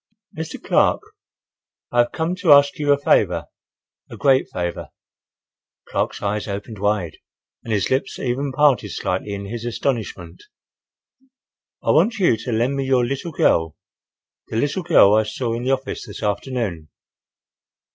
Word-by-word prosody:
"Mr. 160 0 -6
Clark, - - +2 0.9
I 120 - +1
have 120 - +3
come 165 +2 -2
to 180 -4 +2
ask 145 0 +6
you 145 -1 +2
a 140 - +5
favor—a 140 - -2
great 135 -2 +3
favor—" 85 -1 -4 1.0
Clark's - - -2
eyes 105 +1 -2
opened 100 +1 -6
wide 105 -5 -1 0.5
and 115 - -6
his 105 -2 0
lips 130 +1 -1
even 135 +2 -2
parted 130 -6 +3
slightly 95 +2 -3
in 100 0 -6
his 115 +3 -6
astonishment. 120 - -3 1.4
"—I - - +2
want 225 0 +3
you 180 - +3
to 120 +3 -5
lend 120 +5 0
me 135 - -1
your 130 -2 +2
little 140 +7 -4
girl—the 80 - -3
little 145 +10 0
girl 160 - +5
I 110 - +5
saw 115 +2 -3
in 120 +2 -4
the 130 - +1
office 130 -1 -4
this 105 - -9
afternoon." 105 - -3
120 Hz, 145 wpm, -21 LUFS, 105-140 Hz, 1.4 s, ask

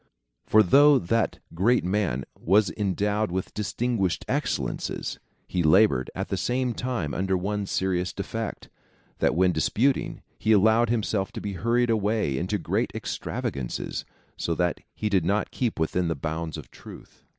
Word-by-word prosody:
For 110 0 +6
though 145 +9 +6
that 115 +3 0 0.2
great 110 +9 +3
man 90 -9 0
was 100 +4 +3
endowed 105 +1 0
Avith 95 +1 -3
distinguished 105 -3 -1
excellences, - - -2 0.3
he 90 - -1
laboured, 80 -5 +4
at - - -3
the - - -1
same 125 0 0
time, 120 - -3
under 95 0 0
one 100 +2 -2
serious 90 -2 0
defect, - - -5 0.5
that - - +2
when 90 +1 +4
disputing 130 +9 0 0.2
he 110 - +3
allowed 110 +3 +4
himself 110 -2 0
to 115 - -5
be 100 -2 -4
hurried 120 +5 +1
away 105 -8 +1
into 95 +4 -1
great 85 - -1
extravagancies, 65 -3 -4 0.3
so 85 - -1
that 90 -1 0 0.2
he 110 - -2
did 95 -5 +2
not 100 +5 0
keep 120 -9 -2
within 85 +2 0
the 80 - 0
bounds 80 +2 -4
of - - -10
truth. - - -13
100 Hz, 150 wpm, -26 LUFS, 90-110 Hz, 0.5 s, For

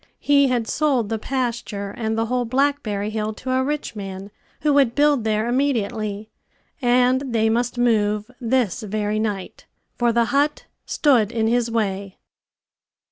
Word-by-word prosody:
He 280 -1 +4
had 245 -3 0
sold 265 -8 +1
the 225 -1 -2
pasture 235 -5 -3
and 220 -1 -2
the 225 - +1
whole 250 +1 0
blackberry 240 -5 0
hill 215 0 -2
to 255 +4 -5
a 260 0 +2
rich 295 -3 -3
man 195 0 -7 0.3
who 300 -1 +2
would 270 -4 +3
build 290 -4 +3
there 215 0 0
immediately; 220 -5 -1 0.5
and 250 +1 +3
they 220 0 +3
must 240 +2 -1
move 215 -2 +1
this 245 -2 0
very 215 0 -2
night, 205 -4 -4 0.3
for 240 -1 +3
the 235 0 +2
hut 290 +2 +1 0.2
stood 240 -8 +3
in 225 -2 0
his 235 +1 +1
way. 200 -4 -2
230 Hz, 150 wpm, -22 LUFS, 215-255 Hz, 0.5 s, He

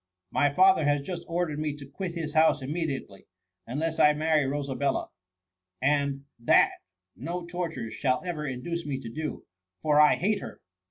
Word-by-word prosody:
^^ - - -61 0.3
My 145 -1 +3
father 185 0 +5
has 145 -1 +2
just 175 +3 -5
ordered 170 -3 -1
me 150 -1 -2
to 145 -1 -10
quit 170 +6 -6
his 155 -3 -4
house 155 -3 +4
immediately, 140 - -4 0.4
unless 155 +6 -2
I 150 - +6
marry 155 -1 +2
Rosabella; 140 -1 -1 0.7
and 140 0 +1
that 115 - +5 0.4
no 170 - -5
tortures 170 -9 -4
shall 130 -2 0
ever 155 -4 -3
induce 155 +7 -4
me 145 -4 -3
to 120 -4 -7
do— 155 +5 -5 0.4
for 150 -1 +4
I 150 - +7
hate 205 +2 0
her - - -8
150 Hz, 165 wpm, -28 LUFS, 140-165 Hz, 0.7 s, I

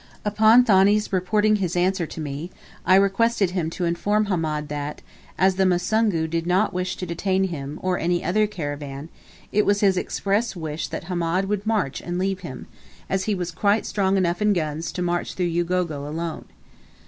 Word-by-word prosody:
Upon 220 +4 +6
Thani's 205 -1 +3
reporting 210 +3 +2
his 180 -4 -2
answer 180 -1 +1
to - - -9
me, 150 +2 -5 0.4
I 185 - +7
requested 200 0 +3
him 175 -4 -1
to 175 +2 -3
inform 205 +5 +1
Hamed 160 -6 -1
that, 145 0 -5 0.3
as 190 0 +3
the 190 - +3
Musungu 185 -1 +1
did 165 +1 -2
not 190 +4 +2
wish 180 +1 -2
to 185 - -5
detain 185 +3 0
him, 145 -2 -5
or 185 -1 0
any 175 +1 0
other 215 +4 +2
caravan, 145 -5 -6 0.4
it 210 - +3
was 205 0 +2
his 195 -3 +3
express 205 +4 -1
wish 160 -2 -4
that - - -5
Hamed 175 +1 -1
would 205 +1 -2
march 210 -12 0
and 175 0 -4
leave 190 +1 -1
him, 160 -9 -8 0.5
as 190 -1 0
he 210 - 0
was 180 -1 -3
quite 200 +5 +1
strong 195 -1 +1
enough 175 0 0
in 210 0 +4
guns 155 -2 -2
to 180 - -2
march 175 0 -2
through 175 -2 -1
Ugogo 170 -4 -1
alone. 165 +2 -4
180 Hz, 185 wpm, -23 LUFS, 165-200 Hz, 0.5 s, I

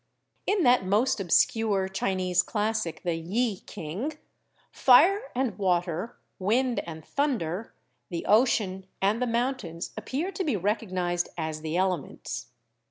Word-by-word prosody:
In 400 -3 +2
that 245 -5 +5
most 210 +7 +2
obscure 200 +1 +2
Chinese 185 -1 +1
classic, 210 -6 -2
the 175 - 0
'Yi 195 +6 -1
King,' 210 - -5 0.5
fire 390 - +5
and 250 -4 0
water, 180 +2 0 0.2
wind 235 +6 +1
and 160 -2 -8
thunder, 225 - -2 0.3
the 170 -2 -4
ocean 205 -4 +2
and 205 +5 +1
the 250 - +1
mountains, 230 -8 -2
appear 270 - -3
to 385 - -3
be 295 -9 0
recognised 185 -3 -1
as 160 -2 -3
the 160 +2 -2
elements. 185 -6 -2
200 Hz, 125 wpm, -27 LUFS, 175-245 Hz, 0.5 s, that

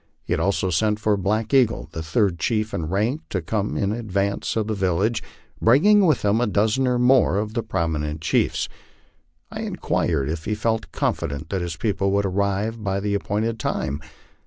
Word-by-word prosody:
He - - -2
had - - 0
also 95 -1 0
sent 105 +5 +1
for 110 -1 +2
Black 105 +5 -1
Eagle, 125 -5 +3
the 80 - -5
third 85 +2 +1
chief 110 +4 0
in 80 - -2
rank, 110 - 0
to 95 - -1
come 100 +5 -2
in 100 0 0
advance 100 -3 -1
of 110 -2 0
the 110 - -2
village, 100 +3 0 0.4
bring 125 - +5
ing 205 -2 +6
with 150 -9 +2
him 105 +3 +3
a 120 - +2
dozen 110 +6 +2
or 125 -1 +2
more 125 -6 +4
of 105 +1 -2
the 115 - 0
prominent 80 -7 -2
chiefs. 80 - +1 0.8
I - - -6
inquired 75 -6 -1
if 80 +1 -4
he 105 - -1
felt 110 +1 -1
confident 70 +3 -2
that 95 -2 -1
his 85 -2 -3
people 100 -1 0
would 100 0 +2
arrive 100 +3 -1
by 100 -1 0
the 100 0 -1
appointed 110 +3 -1
time? 70 -7 -2
105 Hz, 190 wpm, -23 LUFS, 95-110 Hz, 0.8 s, ing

